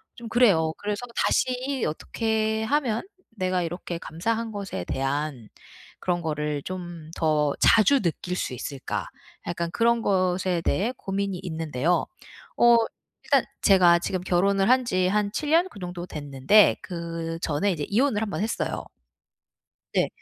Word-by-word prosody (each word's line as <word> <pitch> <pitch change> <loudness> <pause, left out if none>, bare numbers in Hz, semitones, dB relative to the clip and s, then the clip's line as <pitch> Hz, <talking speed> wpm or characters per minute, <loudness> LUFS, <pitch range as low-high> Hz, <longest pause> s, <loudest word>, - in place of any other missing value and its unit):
좀 235 -1 -9
그래요. 200 -10 +4
그래서 205 +1 -3 0.2
다시 255 +1 0
'어떻게 220 +6 -1
하면 255 - 0 0.3
내가 185 -2 0
이렇게 175 0 -4
감사한 225 +9 -2
것에 200 - -5
대한 135 -3 -2 0.5
그런 175 -1 -1
거를 150 -2 -2
좀 175 -4 -7
더 150 -3 +2
자주 230 +5 +5
느낄 180 +1 -2
수 - - -2
있을까?' 135 +2 -4 0.4
약간 170 -1 -2
그런 235 +2 +2
것에 185 -3 +1
대해 210 +8 0
고민이 195 -1 -3
있는데요. 160 -1 0 0.5
어 240 0 +7 0.5
일단 - - +3 0.2
제가 180 -4 +6
지금 185 +1 -2
결혼을 195 +3 +2
한 255 0 +4
지 185 -4 +1
한 205 +1 +1
7 300 -1 -2
년? 340 +3 +4
그 205 - -13
정도 175 -1 -6
됐는데 145 +7 +3
그전에 165 -1 -2
이제 150 -4 -4
이혼을 225 0 +2
1 220 - -2
번 195 - -3
했어요. 225 - -2 1.1
네. - - +2
185 Hz, 260 characters per minute, -25 LUFS, 165-220 Hz, 1.1 s, 어